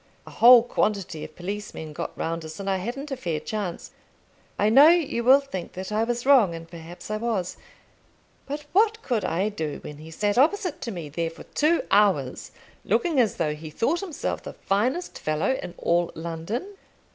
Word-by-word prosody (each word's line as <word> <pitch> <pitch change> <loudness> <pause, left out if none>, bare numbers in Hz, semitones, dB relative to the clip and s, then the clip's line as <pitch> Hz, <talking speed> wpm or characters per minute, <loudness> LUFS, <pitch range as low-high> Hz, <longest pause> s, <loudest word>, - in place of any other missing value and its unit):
A - - -11
whole 240 0 +8
quantity 200 -8 -1
of 155 - -10
policemen 180 -4 -6
got - - -6
round 165 0 -3
us, 160 +2 -9
and 195 - -6
I 195 -1 +1
hadn't 250 +9 -5
a - - -1
fair 170 -12 -3
chance. 190 +1 -5 0.7
I 205 - +2
know 270 +7 +8
you 320 -8 +3
will 260 +3 +7
think 190 -11 -7
that 190 +2 -6
I 215 +1 +1
was 240 +1 -2
wrong, 245 -11 +5
and 165 0 -9
perhaps 170 +4 -10
I 215 - 0
was; 215 -6 -2 0.9
but 290 +1 -5
what 445 +3 +3
could 235 -5 -1
I 190 +5 0
do 160 -8 -4
when 150 - -8
he 155 +1 -11
sat 205 +7 0
opposite 360 +4 +2
to 235 - -4
me 170 -6 -6
there 165 +3 -2
for 165 - -12
two 315 +3 +1
hours, 190 -10 +2 0.3
looking 330 -6 +1
as 225 -6 +2
though 155 -3 0
he 155 +1 -8
thought 275 - 0
himself 370 -7 -4
the - - -8
finest 250 - -1
fellow 155 +10 0
in 175 - -8
all 170 0 +1
London? 170 - -5
205 Hz, 190 wpm, -25 LUFS, 165-260 Hz, 0.9 s, whole